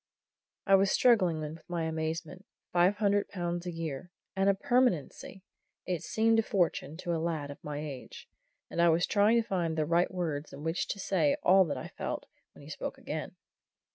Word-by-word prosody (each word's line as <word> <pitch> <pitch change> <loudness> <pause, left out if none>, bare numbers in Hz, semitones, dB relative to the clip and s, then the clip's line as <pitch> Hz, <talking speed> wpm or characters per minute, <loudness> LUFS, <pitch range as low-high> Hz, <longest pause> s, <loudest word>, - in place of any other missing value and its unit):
I 195 - +3
was 195 0 +5
still - - +2
struggling 185 -10 +4
with 155 +2 -6
my 175 -2 -2
amazement. 160 +4 -4 0.3
Five 180 +3 +4
hundred 205 -1 +1
pounds 175 -1 -3
a - - -2
year! 165 -1 -5 0.3
and 195 +1 +3
a 200 - +4
permanency! 240 - 0 0.4
It 180 -4 -2
seemed 225 0 +2
a - - +5
fortune 175 - -1
to 175 -1 -3
a 165 - -1
lad 160 -4 -2
of 140 - -12
my 150 -1 -5
age. 140 -4 -8 0.4
And 170 - -1
I 170 - +6
was 165 +2 +3
trying 215 +3 +4
to 225 - -3
find 170 -4 -1
the 155 - +1
right 170 +3 +2
words 160 -5 -3
in 145 - -9
which 160 +2 -1
to 200 - -4
say 170 -7 +1
all 190 +1 +6
that 155 - -3
I - - -6
felt, - - -5 0.3
when - - -15
he - - -12
spoke - - -5
again. - - -5
175 Hz, 200 wpm, -30 LUFS, 160-195 Hz, 0.4 s, I